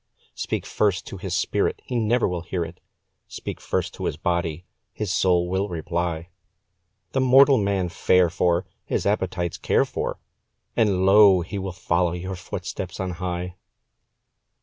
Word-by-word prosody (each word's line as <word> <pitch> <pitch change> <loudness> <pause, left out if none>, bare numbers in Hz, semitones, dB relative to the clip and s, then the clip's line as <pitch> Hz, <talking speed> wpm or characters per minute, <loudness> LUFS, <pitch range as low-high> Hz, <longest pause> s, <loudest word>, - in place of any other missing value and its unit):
Speak - - -3
first 100 -4 0
to 100 - -7
his 95 -1 -3
spirit, - - 0
he 125 - -1
never 115 +2 +2
will 90 -2 -3
hear 85 0 -3
it; 85 +1 -11 0.5
Speak - - -7
first - - -2
to - - -5
his - - -2
body, 85 -1 -1 0.3
his 105 -4 -3
soul 90 -1 +3
will 95 +3 -1
reply; 85 0 -3 0.8
The 135 - +1
mortal 135 +1 +6
man 100 -3 0
fare 90 0 +3
for, 85 0 +1 0.2
his - - -2
appetites 90 -4 -1
care - - +2
for, - - -3 0.6
And 100 -4 +2
lo! 100 -2 +7
he 100 +4 -5
will 95 0 -4
follow 90 -1 0
your 95 +2 -4
footsteps 90 - -6
on 95 -1 -2
high. 90 0 -3
90 Hz, 150 wpm, -24 LUFS, 85-100 Hz, 0.8 s, lo